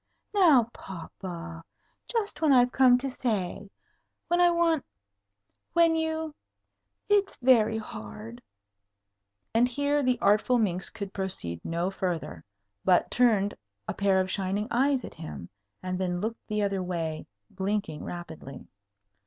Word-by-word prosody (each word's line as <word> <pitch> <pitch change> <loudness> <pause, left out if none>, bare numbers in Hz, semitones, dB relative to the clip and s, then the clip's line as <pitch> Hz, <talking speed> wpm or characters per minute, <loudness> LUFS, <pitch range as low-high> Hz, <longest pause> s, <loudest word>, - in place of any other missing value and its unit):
"Now, 330 - +6
papa! 170 -1 -8 0.4
just 420 -9 -2
when 310 -2 +4
I've 245 -2 +5
come 255 -2 +6
to 265 +2 -3
say 210 -6 -2 0.6
when 345 +1 +3
I 350 - +6
want 335 -3 +2 0.9
when 335 -1 +5
you 320 -1 -2 0.7
it's 410 -1 +2
very 230 -4 +4
hard 110 - -8 0.6
" 100 0 -54
and 235 +2 +4
here 285 +3 0
the 255 -2 +2
artful 215 +5 +3
minx 190 -5 0
could 200 -3 -7
proceed 85 - -4
no 170 +3 -1
further, 170 - -3 0.4
but 180 -2 +3
turned 215 -5 +3 0.3
a - - -2
pair 195 -1 +2
of 185 0 0
shining 200 +2 -1
eyes 265 +1 +2
at - - -9
him, 155 - -8 0.3
and 185 0 -3
then 180 -1 -1
looked 225 +4 -4
the 210 -1 0
other 195 -1 0
way, 165 -3 -3 0.2
blinking 190 -5 -2
rapidly. 160 -6 -8
205 Hz, 135 wpm, -28 LUFS, 175-260 Hz, 0.9 s, Now